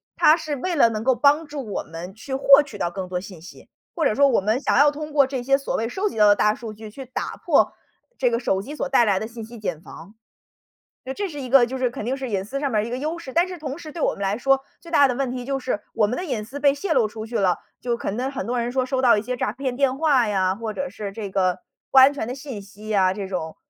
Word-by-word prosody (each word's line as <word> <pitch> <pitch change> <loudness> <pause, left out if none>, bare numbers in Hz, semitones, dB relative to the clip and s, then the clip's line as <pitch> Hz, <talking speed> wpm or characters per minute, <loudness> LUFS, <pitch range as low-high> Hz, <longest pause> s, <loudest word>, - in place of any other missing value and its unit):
它 310 - +6
是 310 -3 -4
为 345 +6 -2
了 235 -6 +5
能 215 0 -4
够 260 -1 +3
帮 295 +4 +3
助 290 -4 -6
我 - - -2
们 165 +4 -8
去 240 +6 -8
获 275 +1 +7
取 230 -8 -10
到 175 -3 -1
更 190 0 -5
多 180 0 -3
信 185 -4 -11
息。 175 - -14 0.3
或 325 - 0
者 215 - +2
说 280 +1 +5
我 250 -7 +2
们 215 +6 +1
想 - - 0
要 290 +2 +7
通 300 +1 -6
过 280 -3 +5
这 260 -2 -4
些 275 +2 +3
所 275 - -3
谓 225 - -1
收 390 - -1
集 - - -9
到 210 - +6
的 205 - +6
大 210 +1 +2
数 225 -3 -8
据 215 0 -10
去 265 +5 -9
打 255 - -5
破 - - +3 0.4
这 245 -2 +2
个 235 - 0
手 195 -6 0
机 275 +9 -8
所 275 - -3
带 265 -3 +4
来 195 -3 +2
的 220 - -4
信 230 -1 -8
息 235 0 -11
茧 180 -7 -4
房。 195 +7 -12 0.9
就 265 - -4
这 400 +2 -3
是 290 - -7
一 255 - -5
个 260 -1 +6
就 260 +2 -5
是 255 -1 +1
肯 240 -2 -7
定 255 +3 -1
是 260 -2 -5
隐 195 -2 -1
私 275 +5 -4
上 280 -1 -1
面 215 -1 +1
一 - - -6
个 245 - -3
优 310 +5 -3
势， 305 -6 -9
但 345 +2 +3
是 365 -1 -7
同 295 0 -6
时 310 -2 -9
对 335 - -6
我 - - +2
们 - - -10
来 200 +1 0
说， 270 +2 +2 0.2
最 335 - -12
大 285 -3 +6
的 250 - -2
问 265 -1 -1
题 250 -1 -5
就 275 0 -2
是， 250 -5 -2
我 210 -2 +2
们 245 - -2
的 360 - -3
隐 245 -8 -3
私 270 +5 -8
被 280 -1 +4
泄 320 +4 -2
露 245 -7 +3
出 220 +1 -7
去 230 +1 -3
了， 185 -3 +2 0.2
就 240 -1 -1
可 - - -3
能 250 +6 -2
很 275 - -4
多 245 +1 -1
人 235 +1 -2
说 255 0 0
收 260 0 -1
到 240 -4 +5
一 - - 0
些 250 +3 -3
诈 210 - -1
骗 255 0 -4
电 270 -1 +1
话 280 -7 +3
呀， 190 -2 +1
或 220 0 -5
者 275 +3 -3
是 205 -5 -6
这 200 -1 -6
个 185 -2 0 0.3
不 270 - +2
安 265 +2 +8
全 245 -6 -4
的 250 - -4
信 265 -6 -7
息 210 +2 -8
啊， 185 -1 +3
这 195 -1 -5
种。 160 -4 -4
245 Hz, 325 characters per minute, -23 LUFS, 210-275 Hz, 0.9 s, 安